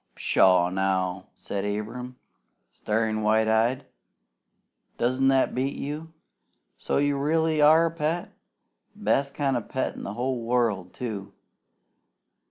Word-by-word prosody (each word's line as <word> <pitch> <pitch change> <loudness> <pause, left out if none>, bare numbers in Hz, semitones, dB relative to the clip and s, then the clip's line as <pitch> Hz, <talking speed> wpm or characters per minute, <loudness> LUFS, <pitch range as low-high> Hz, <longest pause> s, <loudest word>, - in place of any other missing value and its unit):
"Pshaw 90 -2 +3
now!" 95 -1 -1
said 100 -1 -5
Abram, 110 +5 -4 0.6
staring 110 0 -1
wide 110 +1 +2
eyed. 115 +4 +1 1.1
"Doesn't 130 +3 +1
that 135 -1 +3
beat 135 +2 -1
you? 150 +3 -5 0.7
So - - -1
you 145 0 +1
really 160 +1 +1
are 160 +3 +6
a 165 - -1
pet? 165 +1 -2 0.6
Best 135 +6 0
kind 140 -3 0
of 120 - -2
a - - -20
pet 130 - -2
in - - -9
the 100 - -5
whole 125 0 -2
world, 115 -6 0
too! 105 -6 -5
125 Hz, 130 wpm, -26 LUFS, 105-140 Hz, 1.1 s, are